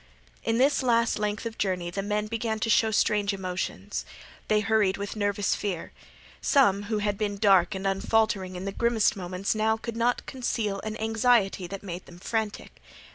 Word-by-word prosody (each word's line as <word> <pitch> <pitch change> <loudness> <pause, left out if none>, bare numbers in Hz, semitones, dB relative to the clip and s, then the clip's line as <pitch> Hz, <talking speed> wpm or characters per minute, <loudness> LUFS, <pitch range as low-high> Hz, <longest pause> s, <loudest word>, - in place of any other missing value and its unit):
In 225 - +1
this 275 +4 +3
last 235 -3 +2
length 210 +1 -2
of 230 0 -5
journey 180 -3 -1
the 195 - -2
men 210 +1 -1
began 225 0 -2
to 225 - +1
show 220 0 +4
strange 205 -1 +2
emotions. 185 -1 -4 0.4
They 210 0 +3
hurried 210 -2 +2
with 200 +1 -5
nervous 205 -1 0
fear. 190 -5 -4 0.5
Some 200 -9 +4
who 220 - +1
had 205 -1 -1
been 205 -2 -1
dark 195 -1 +4
and 190 +1 -5
unfaltering 195 -1 +1
in 180 +2 -5
the 195 - -2
grimmest 230 +1 +2
moments 185 0 -2
now 220 0 +1
could 230 0 -6
not 235 +1 +1
conceal 225 -6 -2
an 215 0 -5
anxiety 220 -4 +2
that 195 +2 -7
made 180 -2 -7
them 175 - -13
frantic. 215 +3 -4
210 Hz, 180 wpm, -27 LUFS, 195-225 Hz, 0.5 s, show